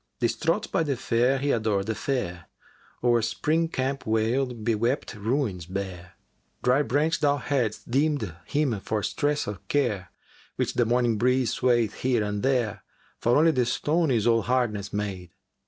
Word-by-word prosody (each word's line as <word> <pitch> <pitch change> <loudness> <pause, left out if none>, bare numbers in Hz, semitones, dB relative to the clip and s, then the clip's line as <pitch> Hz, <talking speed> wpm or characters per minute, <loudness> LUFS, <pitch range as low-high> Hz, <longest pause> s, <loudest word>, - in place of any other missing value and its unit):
[FN#384] - - -50
Distraught 165 - 0
by - - +2
the 145 -5 -1
Fair 120 +4 +2
he 140 +1 0
adored 105 -4 0
the 110 - -1
Fair 100 - -3 0.3
* - - -31
O'er 120 -1 +4
Spring 160 +8 0
camp 135 -3 -3
wailed, 115 +2 0
bewept 115 +4 0
ruins 105 - -2
bare.[FN#385] 90 -1 -5 0.5
Dry 125 +3 +4
branch 150 +5 +1
thou 145 -1 +2
hadst 125 -5 -2
deemed 135 - +1
him 140 -8 0
for 105 +1 -2
stress 150 0 0
o' 105 -3 -4
care, 105 - 0 0.2
* - - -28
Which - - -1
the 120 - +2
morning 120 -2 +2
breeze 125 +1 +2
swayeth 120 -4 +2
here 125 -4 +2
and 105 0 -2
there, 120 -7 0 0.4
For 120 +3 +3
only 165 +2 +5
the 125 -5 +1
stone 160 +5 +1
is 115 -5 +1
all 115 -1 +4
hardness 110 -4 -1
made! 100 -4 -4
120 Hz, 170 wpm, -26 LUFS, 105-135 Hz, 0.5 s, only